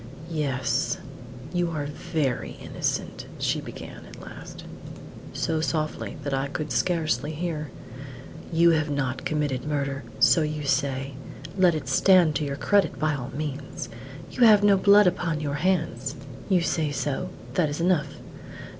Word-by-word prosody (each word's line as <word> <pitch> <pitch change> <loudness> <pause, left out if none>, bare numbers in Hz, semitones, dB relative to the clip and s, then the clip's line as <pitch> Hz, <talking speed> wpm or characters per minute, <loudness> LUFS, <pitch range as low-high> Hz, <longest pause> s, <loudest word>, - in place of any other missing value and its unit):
"Yes; 140 -5 0 0.6
you 175 -1 +1
are 155 -3 -3
very 145 -3 -2
innocent!" - - -3
she - - 0
began - - -9
at - - -12
last, - - -10 0.7
so 160 -1 -1
softly 155 -1 -2
that 140 0 -2
I 135 +1 0
could 150 +2 -4
scarcely 160 -3 0
hear. 155 -2 -3 0.8
"You 170 +1 +5
have 155 -1 +1
not 135 -3 -2
committed 145 -4 -1
murder, 140 -2 -2 0.2
so 165 - +6
you 155 -1 -2
say; 135 0 0 0.4
let 180 -4 +4
it 150 -5 -4
stand 175 +3 +5
to 150 - -2
your 140 -1 -2
credit 200 -4 +2
by 155 +2 +1
all 135 -3 -4
means. 145 -2 -5 0.4
You - - -5
have 210 -2 +7
no 205 -1 +6
blood 200 +2 +6
upon 175 -3 +1
your 145 -2 -2
hands; 155 -8 0 0.3
you 185 -3 +4
say 160 -2 0
so; 145 +5 -2 0.2
that 165 -5 +2
is 145 - -4
enough. 175 -2 +1
155 Hz, 145 wpm, -26 LUFS, 140-170 Hz, 0.8 s, have